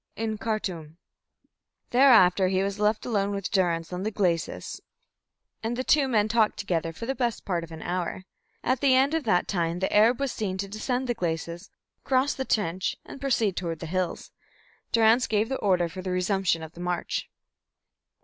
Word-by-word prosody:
"In 220 -1 -3
Khartum." 180 -9 -3 0.9
Thereafter 220 -8 +6
he 190 +1 +1
was 200 +1 -3
left 210 +1 +1
alone 200 -4 0
with 200 -1 -4
Durrance 175 -4 0
on 180 - -3
the 210 - -1
glacis, 180 -6 -2 0.8
and 230 +2 -2
the 255 - -1
two 285 0 +3
men 215 -5 +2
talked 220 -1 +2
together 165 -4 -1
for 165 +8 -7
the 265 - -1
best 240 -4 -2
part 175 -3 -1
of 165 - -10
an 160 0 -8
hour. 180 +1 -3 0.4
At 255 0 +1
the 270 -2 +5
end 270 +3 +3
of 325 -2 -1
that 180 -5 +2
time 170 -3 -1
the 190 +2 -1
Arab 225 +4 +5
was 275 -2 -1
seen 190 -3 -3
to 195 +1 -3
descend 245 +5 -2
the 245 - 0
glacis, 170 -2 -4 0.3
cross 265 +1 +2
the 265 - -4
trench, 190 -5 0
and 275 - -10
proceed 230 -8 +1
toward 170 -2 -3
the 165 - -7
hills. 180 +1 -3 0.6
Durrance 230 +2 +4
gave 215 +1 +1
the 265 - -1
order 180 -4 +2
for 185 +3 -8
the 185 - -5
resumption 180 -2 0
of 160 - -8
the 170 - -15
march. 180 -1 -2
200 Hz, 190 wpm, -26 LUFS, 180-230 Hz, 0.9 s, Thereafter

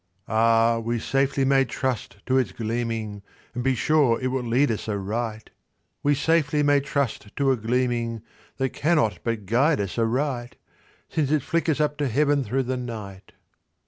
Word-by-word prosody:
Ah, 115 +1 +3
we 115 +1 -2
safely 135 +3 +1
may 135 0 +4
trust 125 -5 -3
to 130 - +1
its 130 - -1
gleaming, 115 -2 -3 0.3
And 125 - -3
be 135 0 +2
sure 140 -3 +3
it 130 - -1
will 130 0 -1
lead 125 +3 +2
us 110 0 -4
aright— 110 +2 -3 0.5
We 145 0 +3
safely 150 0 +2
may 145 0 +4
trust 135 -7 -3
to 140 -1 +2
a - - +3
gleaming 120 -1 -1 0.3
That 135 0 0
cannot 150 -8 +1
but 115 -3 -2
guide 135 - +2
us 100 +3 -3
aright, 120 +1 -1 0.5
Since 150 -4 -1
it 150 -3 +1
flickers 165 -3 0
up 150 -1 +1
to 145 - 0
Heaven 140 +3 +2
through 130 +4 -1
the 130 +1 -2
night." 105 -6 -7
125 Hz, 165 wpm, -25 LUFS, 115-140 Hz, 0.5 s, may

